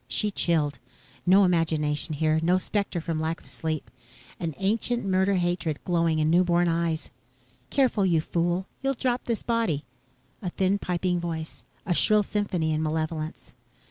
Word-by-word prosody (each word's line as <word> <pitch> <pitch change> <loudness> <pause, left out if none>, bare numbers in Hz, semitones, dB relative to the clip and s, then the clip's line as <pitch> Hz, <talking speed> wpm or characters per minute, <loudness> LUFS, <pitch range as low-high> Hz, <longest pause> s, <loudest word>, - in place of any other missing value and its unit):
She 210 +10 +1
chilled. 155 -6 +1 0.5
No 195 +3 +7
imagination 155 -3 +1
here. 155 +1 +2
No 175 +3 +3
spectre 200 -1 -1
from 160 -1 -2
lack 160 +1 -2
of - - -21
sleep. 155 -2 -4 0.5
Ancient 200 - -1
murder 190 +1 +2
hatred 175 -4 0
glowing 165 -2 +1
in 155 0 +2
new 175 +2 +5
born 175 0 +2
eyes. 165 -1 -1 0.6
"Careful, 255 -7 +2
you 170 -3 +3
fool! 175 +3 0 0.2
You'll 275 0 0
drop 250 0 -1
this 230 -3 -2
body." 225 -11 0 0.6
A 180 - -2
thin 190 +3 +1
piping 180 -1 -1
voice. 165 -2 -5 0.2
A 180 - +1
shrill 210 +4 +4
symphony 185 -6 -1
in 155 - 0
malevolence. 155 -1 -3
175 Hz, 150 wpm, -26 LUFS, 160-195 Hz, 0.6 s, No